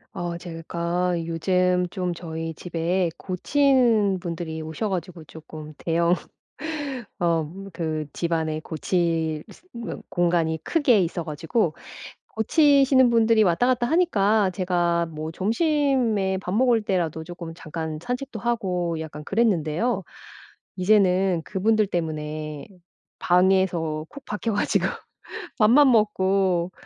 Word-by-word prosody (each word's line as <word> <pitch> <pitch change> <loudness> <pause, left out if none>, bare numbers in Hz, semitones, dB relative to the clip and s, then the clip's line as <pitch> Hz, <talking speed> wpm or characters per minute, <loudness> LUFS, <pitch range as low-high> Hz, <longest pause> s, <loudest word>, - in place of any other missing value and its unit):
어 175 -1 -3
제가 170 +1 -2
요즘 180 +2 +1
좀 180 -1 -2
저희 165 -1 -5
집에 175 +2 -1
고치는 225 -1 +2
분들이 170 -2 -5
오셔 160 +7 -3
가지고 180 -3 -4
쪼끔 155 0 -11
대형 170 +1 +2 1.1
어 165 -3 +1 0.2
그 155 -2 -3
집안에 160 -2 -1
고칠 160 -2 -1 0.3
그 235 -1 -6
공간이 170 -2 +1
크게 285 -10 +3
있어 170 0 -2
가지고 160 - -1 0.5
고치시는 270 +1 +4
분들이 225 -1 +4
왔다 185 +5 +2
갔다 250 -1 +2
하니까 220 - +3
제가 175 -2 0
뭐 155 0 -5
점심에 230 - +1
밥 180 -1 -5
먹을 240 0 +3
때라도 170 -6 -1
쪼끔 170 -1 -8
잠깐 160 -1 -5
산책도 250 0 -4
하고 180 -8 -1
약간 150 -1 -7
그랬는데요. 195 +1 0 0.7
이제는 185 -2 +3
그분들 215 +2 +1
때문에 155 -3 -4 0.5
방에서 175 -4 +2
콕 280 -1 -11
박혀 215 +2 -2
가지고 205 - +1 0.7
밥만 255 +6 +6
먹고 190 -5 +2
180 Hz, 240 characters per minute, -24 LUFS, 165-215 Hz, 1.1 s, 밥만